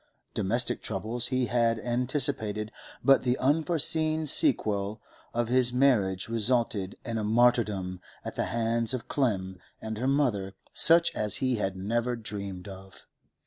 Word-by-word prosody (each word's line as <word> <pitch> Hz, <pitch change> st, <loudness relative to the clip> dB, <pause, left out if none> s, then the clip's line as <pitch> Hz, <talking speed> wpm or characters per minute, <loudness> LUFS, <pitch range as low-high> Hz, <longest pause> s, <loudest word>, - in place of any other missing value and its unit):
Domestic 120 Hz, +6 st, 0 dB
troubles 115 Hz, +4 st, -2 dB
he 130 Hz, 0 st, 0 dB
had 115 Hz, 0 st, +1 dB
anticipated, 120 Hz, -3 st, 0 dB, 0.3 s
but 135 Hz, -1 st, +6 dB
the 125 Hz, 0 st, 0 dB
unforeseen 155 Hz, +1 st, +1 dB
sequel 105 Hz, -, +2 dB, 0.3 s
of 120 Hz, 0 st, -1 dB
his 125 Hz, 0 st, +2 dB
marriage 115 Hz, -8 st, +2 dB
resulted 115 Hz, -4 st, 0 dB
in 115 Hz, -1 st, -2 dB
a -, -, -2 dB
martyrdom 105 Hz, -5 st, +1 dB, 0.2 s
at -, -, -6 dB
the -, -, -1 dB
hands 115 Hz, +2 st, 0 dB
of 125 Hz, -, -7 dB
Clem 95 Hz, -9 st, -1 dB, 0.2 s
and 110 Hz, -1 st, -5 dB
her 130 Hz, -, -1 dB
mother 115 Hz, -9 st, 0 dB, 0.2 s
such 165 Hz, +1 st, +4 dB
as 105 Hz, -2 st, -1 dB
he 130 Hz, -2 st, 0 dB
had 95 Hz, -2 st, -2 dB
never 115 Hz, +6 st, -1 dB
dreamed 100 Hz, -4 st, -6 dB
of. 95 Hz, 0 st, -12 dB
115 Hz, 140 wpm, -28 LUFS, 100-125 Hz, 0.3 s, but